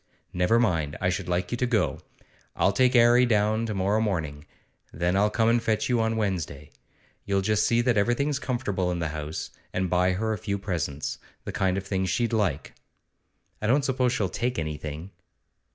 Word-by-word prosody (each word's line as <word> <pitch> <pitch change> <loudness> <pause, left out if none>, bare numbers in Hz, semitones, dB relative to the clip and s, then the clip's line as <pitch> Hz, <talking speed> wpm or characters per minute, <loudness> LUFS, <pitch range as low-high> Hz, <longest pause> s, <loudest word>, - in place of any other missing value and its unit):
'Never 90 +6 +3
mind; 80 -10 0
I 90 - +1
should 90 - -3
like 90 0 -1
you 120 - -1
to 125 - +1
go. 115 -4 +1 0.6
I'll 95 - +3
take 130 +4 +3
'Arry 120 +1 +6
down 110 0 +2
to 110 - -3
morrow 100 +3 +1
morning, 80 -9 -2 0.5
then 85 +3 0
I'll 105 +2 +3
come 110 +1 +1
and 115 +1 +3
fetch 110 0 0
you 120 -2 +2
on 110 0 0
Wednesday. 85 -9 -3 0.5
You'll 100 -1 0
just 105 +1 +2
see 120 0 +3
that 120 -2 +1
everything's 130 +7 +1
comfortable 105 -9 -1
in 90 - -1
the 85 -2 -2
house, 75 0 -5 0.2
and 90 -1 -2
buy 90 +1 +3
her 110 +4 -1
a 105 - -4
few 100 -2 -2
presents, 85 -7 -3 0.2
the - - -5
kind 95 -1 0
of 95 - -4
things 95 -1 -1
she'd 120 -1 0
like.' 95 -10 -1 0.9
'I 110 - -1
don't 135 +4 +3
suppose 130 -2 +1
she'll 105 -5 0
take 120 +6 -2
anything. 75 +3 -5
100 Hz, 190 wpm, -26 LUFS, 90-115 Hz, 0.9 s, Arry